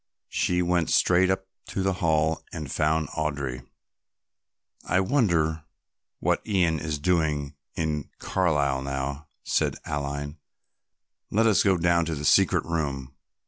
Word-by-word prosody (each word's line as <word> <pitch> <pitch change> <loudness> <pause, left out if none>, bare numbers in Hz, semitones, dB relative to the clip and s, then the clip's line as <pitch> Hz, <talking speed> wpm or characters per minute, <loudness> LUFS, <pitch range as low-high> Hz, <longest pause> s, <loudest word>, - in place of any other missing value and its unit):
She 90 0 +1
went 85 -2 +1
straight 90 +1 +4
up 95 0 0 0.2
to 95 - -2
the 95 0 +1
Hall 80 -1 +1
and 75 -6 -6
found 75 0 +1
Audry. 70 -5 -3 1.2
"I 90 - +1
wonder 85 - +1 0.6
what - - +1
Ian 90 -7 +1
is 75 0 -3
doing 75 -3 0 0.2
in 75 -3 -2
Carlisle 75 -7 +1
now," 70 +2 -4 0.2
said - - 0
Aline. 75 +1 -4 0.9
"Let 110 +3 +2
us 110 -3 +4
go 95 -3 +3
down 85 0 +2
to 80 -1 -2
the 75 +1 -5
secret - - +4
room. 70 -5 -3
80 Hz, 130 wpm, -26 LUFS, 70-90 Hz, 1.2 s, straight